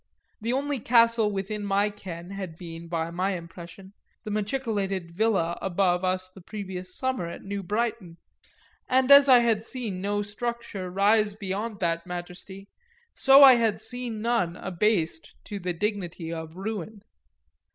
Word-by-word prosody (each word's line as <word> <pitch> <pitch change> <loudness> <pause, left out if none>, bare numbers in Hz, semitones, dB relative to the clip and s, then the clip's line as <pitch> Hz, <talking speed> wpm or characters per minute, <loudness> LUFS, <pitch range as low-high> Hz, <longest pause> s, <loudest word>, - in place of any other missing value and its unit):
The 230 +2 -1
only 280 +1 -1
castle 230 -1 +4
within 205 +2 -4
my 200 +1 +1
ken 180 -3 -9
had 190 -5 -6
been, 170 -1 -9
by 165 -1 -2
my 185 +3 -1
impression, 175 +3 -10 0.3
the 215 - -5
machicolated 205 -5 -2
villa 185 -3 0
above 185 -1 +1
us 185 0 0
the 185 +1 -15
previous 185 -2 -7
summer 260 -9 -1
at 170 - -8
New 200 0 -4
Brighton, 210 -3 -2 0.7
and 260 +1 +3
as 280 0 +9
I 250 -2 +8
had 225 -2 +1
seen 225 -6 -4
no 205 +1 -1
structure 210 -2 -5
rise 205 +2 +2
beyond 205 +1 -4
that 170 0 -1
majesty 180 +2 -8 0.5
so 270 +1 +7
I 260 -3 +9
had 225 -3 +1
seen 245 -3 -5
none 230 -8 +1
abased 180 -4 -1
to 205 - -6
the 180 -1 -2
dignity 175 -3 -3
of 160 0 -7
ruin. 205 0 -5
200 Hz, 150 wpm, -26 LUFS, 180-225 Hz, 0.7 s, as